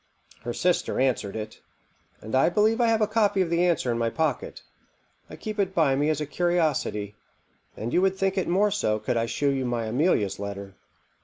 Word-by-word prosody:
Her 120 - -4
sister 180 +3 0
answered 125 -6 0
it, 110 0 -7 0.6
and 110 - -9
I 130 +5 +4
believe 215 +6 +2
I 235 - +4
have 225 -1 +2
a 215 - +3
copy 210 -2 +1
of 180 -3 +1
the 170 +1 +2
answer 170 -8 +1
in 115 - -1
my 115 0 +1
pocket. 155 -1 -2 0.7
I - - -9
keep 215 -1 -6
it 190 -1 0
by 150 -5 +3
me 145 +3 +1
as 155 -2 0
a 150 - -2
curiosity, 150 - 0 0.6
and 115 +2 -4
you 180 - +3
would 190 0 +1
think 195 0 0
it 190 - -1
more 200 +4 +2
so 110 - 0
could 110 - -2
I 115 0 0
shew 140 +4 0
you 135 -1 -1
my 120 -2 -2
Amelia's 110 - +1
letter." 100 -1 -6
150 Hz, 210 wpm, -26 LUFS, 115-190 Hz, 0.7 s, I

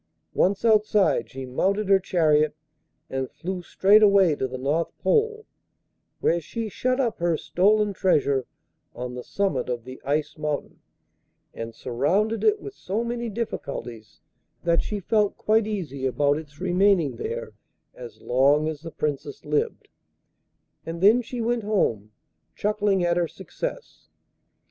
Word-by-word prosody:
Once 195 +4 +1
outside 215 -2 +3
she 135 0 -7
mounted 195 +11 0
her 195 0 +5
chariot 155 -5 +2 0.5
and 130 -1 -3
flew 185 +1 -5
straight 200 +4 +4
away 200 -5 +5
to 130 - -2
the 130 0 -6
North 145 +6 -1
Pole, 440 -1 +1 0.8
where 170 +1 +2
she 225 +8 -5
shut 255 +5 -1
up 230 -5 0
her 170 -1 +1
stolen 205 +5 +2
treasure 140 -9 +1 0.5
on 125 0 -5
the 125 0 -6
summit 200 -9 -1
of 120 -2 -3
the 130 +2 -10
Ice 150 +2 -1
Mountain, 150 -1 -3 0.7
and 115 0 -7
surrounded 190 - 0
it 430 -1 +3
with 405 - -8
so 215 - -3
many 235 0 -3
difficulties 140 - -6 0.4
that 170 -1 +3
she 210 - -4
felt 210 +1 +1
quite 215 0 +2
easy 150 -11 -3
about 145 +3 +1
its 150 -2 -13
remaining 180 -4 +2
there 470 +1 -5 0.4
as - - -11
long 140 +5 +3
as 155 -2 -4
the 165 - -7
Princess 145 -2 -4
lived, 150 0 -1 1.0
and 165 +1 -6
then 215 +6 +6
she 245 0 -5
went 235 +1 0
home, 115 - 0 0.4
chuckling 205 -2 +1
at 175 0 +2
her 175 -1 +1
success. - - -7
180 Hz, 145 wpm, -25 LUFS, 145-215 Hz, 1.0 s, then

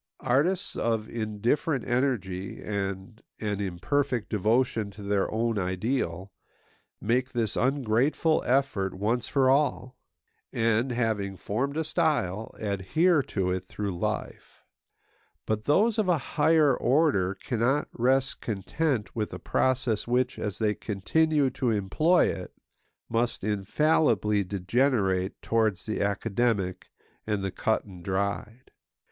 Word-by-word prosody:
Artists 150 +9 +1
of 110 -2 -1
indifferent 120 - -1
energy 105 -8 -1
and 100 +1 -4 0.2
an 105 -2 -2
imperfect 105 +7 -1
devotion 110 +1 +1
to 100 +1 -11
their 100 -1 0
own 115 -1 0
ideal 95 -1 -2 0.7
make 125 +4 0
this 115 -4 -1
ungrateful 135 +4 +2
effort 120 -8 +1
once 115 +5 -1
for 135 -2 +2
all; 130 -2 +1 0.6
and, 115 +3 +1
having 110 -5 -1
formed 135 +11 -2
a 160 - +1
style, 145 - 0
adhere 110 - +2
to 95 -7 -2
it 95 0 -2
through 100 0 -4
life. 85 - -4 0.8
But 110 0 -2
those 215 +9 +3
of 205 -4 +1
a 175 - +4
higher 150 0 +3
order 125 - +2
cannot 125 +7 0
rest 130 +2 +1
content 115 - -2
with 110 -2 -2
a - - -4
process 125 -5 0
which, 125 +1 0
as 105 -4 -3
they 105 -2 +1
continue 140 +9 +1
to 125 -1 -1
employ 115 - +3
it, - - -4 0.5
must 120 -2 -1
infallibly 105 0 +2
degenerate 95 0 0
towards 110 -5 +1
the 110 - -2
academic 100 -1 -1 0.4
and 105 -2 -1
the 95 - -2
cut 110 - 0
and 90 -4 -12
dried. 100 +6 -3
115 Hz, 120 wpm, -27 LUFS, 100-135 Hz, 0.8 s, a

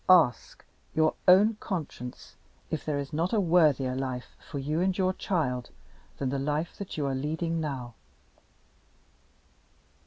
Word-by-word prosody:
"Ask 165 -10 +4 0.3
your 155 0 +4
own 205 +4 +7
conscience 150 - -5 0.4
if 155 - -2
there 150 -2 -1
is 140 +2 -4
not 165 +6 0
a 220 - +4
worthier 155 -8 +3
life 130 -1 -4
for 145 - -4
you 150 +4 -1
and 185 0 +1
your 185 -1 +2
child 135 -11 -1 0.5
than 135 - -1
the 135 +1 -1
life 150 +4 -1
that 200 -4 -6
you 145 - 0
are 135 - 0
leading 160 +5 -1
now." 130 -6 -4
155 Hz, 145 wpm, -28 LUFS, 135-175 Hz, 0.5 s, own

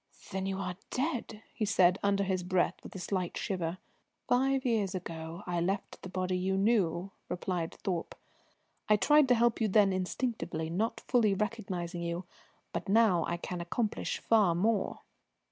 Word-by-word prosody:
"Then 190 0 -2
you 195 0 -2
are 180 -2 -4
dead?" 245 -6 -2
he 220 - -3
said 190 -3 +4
under 200 0 +2
his 190 -2 0
breath 180 0 +1
with - - -11
a - - -3
slight 185 -1 -2
shiver. 180 -4 -2 0.5
"Five 265 +1 +2
years 210 -6 +1
ago 165 0 -6
I 175 -1 -1
left 195 +4 -2
the 185 - -7
body 185 0 -1
you 190 +1 0
knew," 195 -4 +2 0.2
replied 175 -2 -2
Thorpe. 175 -4 -3 0.7
"I 210 - +7
tried 295 +6 +5
to 250 - +5
help 235 0 +2
you 220 - +3
then 200 -1 +4
instinctively, 185 -4 -2
not 215 +7 -1
fully 220 -5 +3
recognising 190 -5 -3
you. 170 +1 -3 0.5
But - - -3
now 200 -6 +4
I 170 - -1
can 175 0 -5
accomplish 210 +6 -1
far 210 -7 +3
more." 205 +3 0
190 Hz, 160 wpm, -31 LUFS, 180-220 Hz, 0.7 s, I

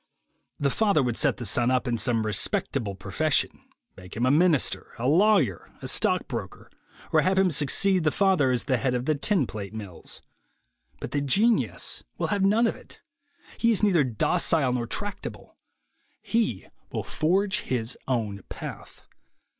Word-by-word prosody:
The 140 -1 +1
father 200 -10 +2
would 120 -2 -1
set - - +1
the 120 - -6
son 120 +4 +1
up 130 0 +1
in 120 - 0
some 115 -1 0
respectable 105 +2 -1
profession, 100 +11 0 0.4
make 90 +2 -11
him 120 - +1
a 130 - +4
minister, 160 -1 +2
a 120 - -2
lawyer, 165 - +3
a - - -6
stock - - +1
broker, - - -7 0.4
or - - +5
have 190 +1 +1
him 190 -2 +4
succeed 180 +6 +2
the 155 - +3
father 185 -6 +2
as 125 -2 0
head 130 -2 0
of 125 0 -2
the 155 - +2
tin 155 +1 +1
plate 105 -2 -7
mills; 100 -6 -8 0.8
but - - -6
the 145 - 0
genius 140 - +1
will - - -1
have 200 - 0
none 215 +4 +4
of - - 0
it. - - -13 0.6
He 230 - +3
is 220 - 0
neither 180 -7 +4
docile 135 - +1
nor 120 -2 -2
tractable; 205 - -4 0.7
he 225 - 0 0.3
will - - -3
forge 190 +6 +1
his 125 - -2
own 110 -6 -2
path. - - -9
140 Hz, 160 wpm, -26 LUFS, 115-190 Hz, 0.8 s, or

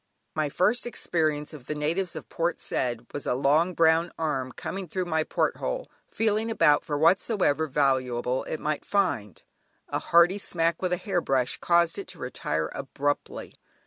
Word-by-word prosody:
My 155 -1 0
first 210 - +1
experience 155 -9 -1
of 135 -4 -11
the 150 - -3
natives 165 +5 -1
of - - -7
Port 170 0 -1
Said 120 -2 -1
was 145 - -5
a - - +1
long 150 +7 +2
brown 165 +1 +3
arm 135 -5 -1
coming 190 +6 -5
through 185 +3 -2
my 160 -2 +1
porthole, - - -2 0.2
feeling 220 0 0
about 160 -9 +4
for 150 -4 -2
whatsoever 165 -1 +2
valuable 130 -3 +1
it 155 - -4
might 150 0 -2
find; 115 - -1 0.5
a - - -1
hearty 170 +4 +4
smack 165 -3 0
with 185 -1 0
a 180 - +2
hair 190 -2 -1
brush 130 -4 0
caused 170 +1 +2
it 200 - -7
to 185 -1 -10
retire 80 - -3
abruptly. 145 +1 -3
160 Hz, 165 wpm, -27 LUFS, 140-180 Hz, 0.5 s, about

